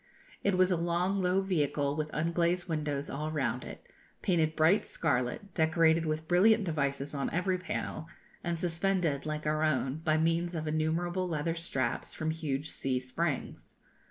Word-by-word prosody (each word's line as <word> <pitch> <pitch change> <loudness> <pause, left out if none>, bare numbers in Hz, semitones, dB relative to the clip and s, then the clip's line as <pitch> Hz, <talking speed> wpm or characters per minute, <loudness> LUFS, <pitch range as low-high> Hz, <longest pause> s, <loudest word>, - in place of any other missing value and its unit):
It 200 -2 +2
was 185 0 +4
a 180 - +2
long 175 +3 0
low 185 +1 +2
vehicle, 145 -6 0
with 155 0 -2
unglazed 170 +3 0
windows 150 -3 -2
all 150 +3 -3
round 130 -4 -1
it, - - -10 0.4
painted 160 -4 +2
bright 165 +6 +4
scarlet 145 +6 -1
decorated 160 0 +3
with 155 +1 -2
brilliant 210 +5 +5
devices 140 -4 -1
on 140 -1 -1
every 185 +2 0
panel, 180 -3 -4 0.4
and 170 -1 -1
suspended, 170 -3 0
like 155 0 -3
our 155 0 +1
own, 140 -3 +1
by 160 -1 +1
means 165 +2 +1
of 155 -1 -3
innumerable 165 +4 0
leather 165 -1 -1
straps, 135 -7 -2
from 155 0 -1
huge 150 -2 -3
C 130 -1 -1
springs. 135 +3 -3
160 Hz, 155 wpm, -31 LUFS, 150-175 Hz, 0.4 s, brilliant